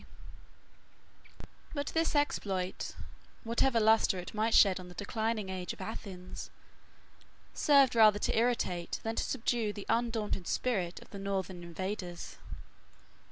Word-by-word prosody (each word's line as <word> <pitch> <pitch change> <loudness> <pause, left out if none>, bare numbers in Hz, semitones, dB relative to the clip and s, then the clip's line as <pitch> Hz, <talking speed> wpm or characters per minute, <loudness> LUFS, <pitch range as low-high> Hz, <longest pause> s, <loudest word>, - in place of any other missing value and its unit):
] - - -19
But 285 0 -2
this 325 -1 +1
exploit, 195 -10 -1 0.5
whatever 235 +1 +2
lustre 220 -3 +4
it 180 - -7
might 220 +1 +1
shed 190 -2 +6
on 180 - -9
the 180 - -12
declining 220 +1 -2
age 185 -1 -4
of - - -14
Athens, 190 -5 -7 1.0
served 280 -4 +5
rather 215 -3 +6
to - - 0
irritate 220 -7 0
than 225 0 -2
to - - 0
subdue 235 -3 0
the 205 -2 -8
undaunted 225 -6 0
spirit 190 -9 -1
of - - -22
the 200 - -7
northern 190 -2 -3
invaders. 175 +1 -5
210 Hz, 130 wpm, -32 LUFS, 185-230 Hz, 1.0 s, shed